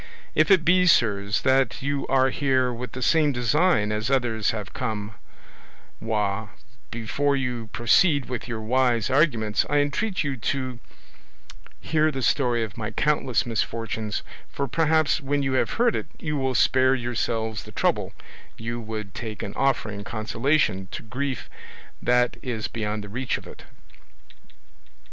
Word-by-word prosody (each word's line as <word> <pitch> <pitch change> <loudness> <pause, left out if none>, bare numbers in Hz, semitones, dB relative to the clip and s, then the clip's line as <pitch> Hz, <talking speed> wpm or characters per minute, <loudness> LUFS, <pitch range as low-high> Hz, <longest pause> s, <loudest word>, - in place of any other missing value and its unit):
If 155 0 +3
it 185 -4 +5
be, 180 +1 +4
sirs, 105 - +3
that 130 -1 +2
you 140 0 -1
are 135 0 +3
here 130 -3 +1
with 120 0 -7
the 130 - -4
same 155 +1 +3
design 125 - +2
as 105 +2 -1
others 120 -5 +1
have 105 -3 -4
come 110 -4 -3 0.9
with, 105 -1 -1 0.4
before 140 +5 0
you 125 -4 -3
proceed 140 +4 +3
with 125 -2 -5
your 115 -2 -4
wise 125 +1 +1
arguments, 120 -7 +2
I 145 - +2
entreat 165 +8 0
you 140 -2 -2
to 130 +1 -3 1.0
hear 155 -1 +2
the 135 -4 -4
story 120 -4 +2
of 105 -4 -7
my 105 0 -3
countless 130 +1 +1
misfortunes, 115 -2 -2 0.3
for 140 - -3
perhaps 160 +2 +2
when 140 +1 0
you 135 -1 0
have 130 - +1
heard 235 -1 +2
it - - -3
you 150 -2 -3
will 130 -2 -1
spare 130 +1 +4
yourselves 115 -4 -2
the - - -11
trouble - - 0 0.5
you 115 +1 -4
would 110 -3 -6
take 110 -4 -6
in 100 - -5
offering 115 -7 0
consolation 115 -1 0
to - - -5
grief 130 +3 -4 0.5
that 125 0 +2
is 115 -4 -3
beyond 105 -2 -3
the 105 - -9
reach 125 +5 -2
of - - -12
it." - - -12
125 Hz, 150 wpm, -25 LUFS, 110-140 Hz, 1.0 s, it